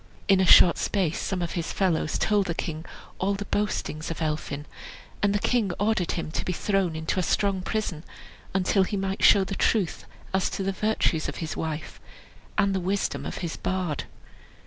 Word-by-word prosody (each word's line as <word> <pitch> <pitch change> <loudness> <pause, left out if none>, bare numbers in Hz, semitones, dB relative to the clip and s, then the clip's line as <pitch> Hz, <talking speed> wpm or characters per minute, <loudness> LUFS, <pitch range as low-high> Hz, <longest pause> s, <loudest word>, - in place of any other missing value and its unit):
In 195 -1 +5
a 190 - +3
short 175 - +8
space 180 -6 0
some 180 -2 -2
of 170 - -3
his 170 -2 -3
fellows 170 -5 +1
told 205 -2 +2
the 170 - -2
king 160 -1 -4 0.3
all 200 +2 +1
the 205 +1 -5
boastings 205 -7 -2
of 165 - -4
Elphin; 150 -2 -3 0.6
and 205 - +3
the 205 - +2
king 215 -2 +1
ordered 205 -4 +1
him 165 -2 -4
to - - -2
be 180 - -2
thrown 190 -2 0
into 160 +3 -1
a - - +3
strong 195 +2 +1
prison, 180 -5 -2 0.5
until 190 +1 +2
he 200 +2 0
might 195 0 -2
show 200 - +7
the 190 - -4
truth 195 -2 0 0.3
as 190 0 +2
to 195 - -3
the 195 - 0
virtues 195 -5 0
of - - -6
his 160 -2 -4
wife, 160 -1 -5 0.6
and 200 -2 +3
the 190 - 0
wisdom 195 +3 -1
of - - -5
his 165 - -4
bard. 180 -6 -2
190 Hz, 190 wpm, -26 LUFS, 165-200 Hz, 0.6 s, short